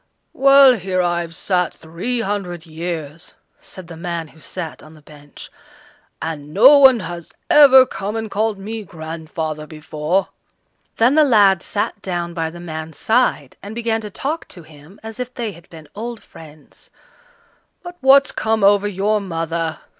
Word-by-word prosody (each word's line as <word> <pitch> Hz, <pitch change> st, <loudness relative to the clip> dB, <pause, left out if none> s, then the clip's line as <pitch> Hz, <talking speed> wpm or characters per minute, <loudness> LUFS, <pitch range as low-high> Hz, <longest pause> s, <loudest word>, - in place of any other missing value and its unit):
"Well, 275 Hz, -1 st, +7 dB
here 185 Hz, -1 st, -2 dB
I've 170 Hz, -1 st, -2 dB
sat 180 Hz, -1 st, -1 dB
three 180 Hz, +10 st, -4 dB
hundred 190 Hz, -5 st, -4 dB
years," 160 Hz, -1 st, -6 dB, 0.2 s
said 185 Hz, -, -10 dB
the 165 Hz, 0 st, -11 dB
man 170 Hz, -1 st, -5 dB
who 160 Hz, -, -20 dB
sat 165 Hz, 0 st, -7 dB
on 155 Hz, +1 st, -15 dB
the 155 Hz, -, -18 dB
bench, 145 Hz, -1 st, -14 dB, 0.7 s
"and 150 Hz, -2 st, -6 dB
no 265 Hz, +8 st, +8 dB
one 260 Hz, -4 st, +6 dB
has 170 Hz, -1 st, -8 dB, 0.2 s
ever 265 Hz, -3 st, +8 dB
come 205 Hz, -2 st, -5 dB
and 220 Hz, -2 st, -4 dB
called 215 Hz, 0 st, -1 dB
me 215 Hz, +3 st, -6 dB
grandfather 160 Hz, -3 st, -6 dB
before." 155 Hz, +3 st, -2 dB, 0.7 s
Then 235 Hz, +4 st, +3 dB
the 310 Hz, +1 st, +5 dB
lad 205 Hz, -9 st, +4 dB
sat 205 Hz, 0 st, -3 dB
down 175 Hz, -2 st, -4 dB
by 165 Hz, -1 st, -2 dB
the 175 Hz, +2 st, -11 dB
man's 160 Hz, -2 st, -7 dB
side, 220 Hz, -, 0 dB
and 205 Hz, +2 st, -9 dB
began 230 Hz, -1 st, -1 dB
to 210 Hz, -, -7 dB
talk 295 Hz, -, -4 dB
to 175 Hz, -, -11 dB
him 155 Hz, +5 st, -17 dB
as 225 Hz, +1 st, -9 dB
if 250 Hz, 0 st, -4 dB
they 235 Hz, -4 st, -3 dB
had 170 Hz, -2 st, -17 dB
been 160 Hz, -2 st, -13 dB
old 230 Hz, +2 st, -7 dB
friends. 155 Hz, -2 st, -16 dB, 0.9 s
"But 355 Hz, 0 st, -9 dB
what's 275 Hz, +1 st, +5 dB
come 220 Hz, -1 st, -1 dB
over 205 Hz, +1 st, +4 dB
your 205 Hz, +2 st, 0 dB
mother?" 165 Hz, -3 st, -3 dB
185 Hz, 160 wpm, -19 LUFS, 160-225 Hz, 0.9 s, no